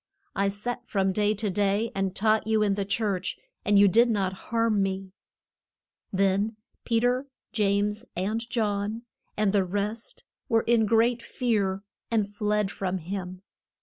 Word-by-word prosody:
I 200 0 +2
sat 240 +4 -4
from 195 -2 +1
day 210 +2 +1
to 210 -1 -1
day 205 +3 +1
and 195 -1 -1
taught 220 +1 +2
you 220 -1 +3
in 205 -1 +2
the 200 0 -2
church, 200 -2 -1 0.3
and 205 0 +3
you 200 0 +7
did 230 +5 +5
not 195 -4 0 0.2
harm 230 -3 +2
me. 190 0 -2 1.0
Then 195 +3 +1 0.3
Pe 230 -1 +2
ter, 250 +3 +1 0.2
James 210 0 +1
and 200 +5 -1
John, 215 -1 -1 0.3
and 210 -2 +2
the 200 -2 +4
rest, 205 +4 -4 0.3
were 225 -2 +3
in 230 -2 +3
great 230 +2 +3
fear, 200 -7 -1 0.3
and 220 -3 +1
fled 210 -1 0
from 190 -1 -2
him. 185 +1 -6
205 Hz, 150 wpm, -27 LUFS, 195-225 Hz, 1.0 s, you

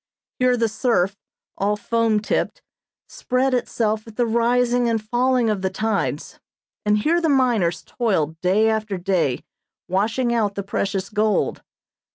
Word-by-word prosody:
Here 250 -1 +3
the 230 -1 +2
surf, 210 -4 0 0.4
all 205 +1 +1
foam 225 -1 +1
tipped, - - -2 0.4
spread 255 +1 -1
itself 220 -3 -1
at 225 - -12
the 245 - +1
rising 240 +1 +2
and 225 -1 +1
falling 245 +2 +1
of 210 -3 0
the 190 - 0
tides, 215 +2 -2 0.4
and 210 0 +2
here 330 +11 +1
the 325 - +1
miners 235 - +2
toiled 165 - -1
day 195 +5 +3
after 215 -3 -1
day 175 -8 0 0.4
washing 225 +6 0
out 210 -4 0
the 200 - -3
precious 195 0 -2
gold. 215 0 0
220 Hz, 145 wpm, -22 LUFS, 200-240 Hz, 0.4 s, Here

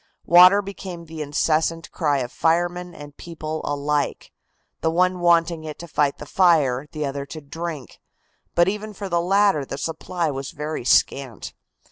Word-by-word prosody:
Water 180 +4 +7
became 190 -3 -8
the 160 -1 -8
incessant 160 +3 0
cry 150 -4 0
of 125 0 -5
firemen 175 +1 0
and 145 -1 -11
people 160 -2 -6
alike, 145 0 -2 0.5
the 160 - 0
one 180 +2 +1
wanting 170 -1 +2
it 155 -1 -7
to 170 - -9
fight 145 -3 0
the - - -9
fire, 150 -6 +2
the 155 -2 -3
other 140 0 -4
to 155 - -8
drink, 155 -2 -7 0.6
but 175 +1 +4
even 210 +2 -3
for 200 -1 -6
the 170 -1 +1
latter 195 -3 +3
the 135 - -6
supply 165 +1 -3
was 135 -1 -5
very 150 -2 -4
scant. 130 0 +1
165 Hz, 160 wpm, -23 LUFS, 145-175 Hz, 0.6 s, Water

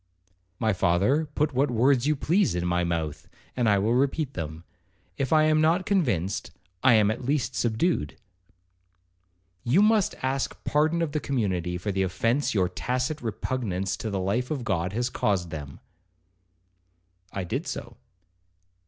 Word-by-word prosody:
'My 110 0 +1
father, 100 - +2
put 150 -1 +1
what 135 +3 +2
words 125 +2 +3
you 155 - +3
please 175 - +1
in 90 0 -1
my 90 0 +1
mouth, 80 -3 -3 0.3
and 120 -3 +2
I 100 - +4
will 105 +4 +1
repeat 140 +2 0
them,—if 90 - -7
I 155 -1 +5
am 155 0 +3
not 165 +4 +2
convinced, 120 - 0 0.3
I 120 - +6
am 105 -1 +4
at 120 +3 -5
least 130 -2 0
subdued.' 120 - 0 1.5
'You 160 +13 +4
must 215 -2 +3
ask 130 +1 -1
pardon 155 +3 +2
of 155 - -2
the 150 - -1
community 95 - -1
for 100 +4 -3
the 95 0 -1
offence 115 +8 0
your 95 -3 +3
tacit 125 - -2
repugnance 105 -5 -2
to 110 - -4
the 100 -2 -2
life 105 +7 -1
of 145 -5 -3
God 90 -5 -1
has 120 +2 -1
caused 90 -5 0
them.' 75 -4 -7 1.5
I 95 - -3
did 130 - -3
so. 120 0 -6
120 Hz, 155 wpm, -26 LUFS, 95-140 Hz, 1.5 s, I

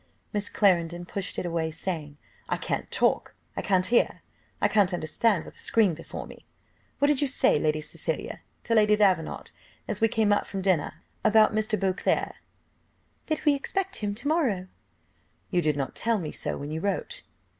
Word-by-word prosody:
Miss 205 -1 -1
Clarendon 175 -3 +2
pushed 195 +1 -4
it - - -2
away, 165 -2 -1
saying, 155 -3 -5 0.3
"I - - 0
can't - - -3
talk, - - +1 0.2
I - - -2
can't 185 -2 +2
hear, 235 - +2 0.4
I - - +3
can't 200 -4 +3
understand 175 +4 +1
with - - -11
a - - -10
screen 215 -6 +3
before 165 - -7
me. - - -13 0.5
What 285 - +3
did 290 -2 +2
you 290 - +2
say, 255 - +3
Lady 155 0 0
Cecilia, - - -2 0.2
to 230 - -1
Lady 210 -1 +5
Davenant, 190 -6 +1 0.4
as 210 -1 -3
we 225 - +5
came 220 -2 +2
out 205 - 0
from 195 -1 -4
dinner, 165 -4 0 0.2
about 215 0 +5
Mr. 215 0 0
Beauclerc?" 190 -1 0 0.9
"That 310 -1 -2
we 295 - +6
expect 385 +7 -2
him 205 -1 -2
to 240 +7 -1
morrow." 240 - +1 0.8
"You 180 -2 +2
did 150 -3 +1
not 135 -2 -2
tell 230 -1 +1
me 160 -6 -4
so - - -2
when 145 +1 -6
you 160 +1 -3
wrote!" 205 - -2
200 Hz, 180 wpm, -27 LUFS, 170-225 Hz, 0.9 s, we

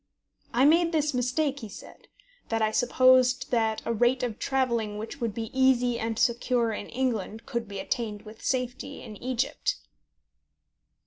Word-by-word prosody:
I 250 +3 +3
made 335 +3 +4
this 305 -2 +1
mistake, 265 +3 0
he 220 -5 -8
said, 195 - -12 0.4
that 225 - 0
I 215 -1 +2
supposed 255 +2 +4
that 225 -2 +1
a 230 - 0
rate 245 +3 +2
of 230 -3 -3
travelling 235 -6 0
which 225 +5 -7
would 225 -3 -2
be 225 -1 -4
easy 250 -2 +3
and 225 -1 -2
secure 235 0 +1
in 205 - -5
England 230 -3 -2
could 235 -4 -3
be 200 -1 -7
attained 215 0 -3
with 220 0 -13
safety 255 +1 -2
in 215 - -9
Egypt. 255 +3 -1
245 Hz, 155 wpm, -27 LUFS, 225-260 Hz, 0.4 s, made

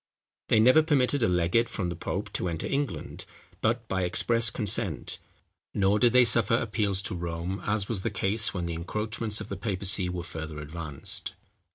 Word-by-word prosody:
They 110 - +4
never 130 +8 +6
permitted 145 -3 +2
a - - +3
legate 90 +6 +2
from 90 -4 -3
the 85 - -4
pope 85 - -4
to 90 - -1
enter 80 -2 -3
England, 140 -1 -3 0.4
but 115 +1 0
by 95 -3 -1
express 115 +6 +4
consent; 105 - 0 0.6
nor 100 +1 +3
did 120 +2 +5
they 125 0 +6
suffer 115 0 +3
appeals 105 -4 -1
to - - -3
Rome, 85 +2 -4
as 105 -1 0
was 110 -5 -2
the - - -1
case 110 +3 +1
when 90 -3 -3
the 85 - -3
encroachments 105 +5 -2
of 110 - -8
the 100 - -4
papacy 95 -2 -1
were 90 -1 -4
further 80 -3 -7
advanced. 75 -1 -2
100 Hz, 180 wpm, -27 LUFS, 90-115 Hz, 0.6 s, never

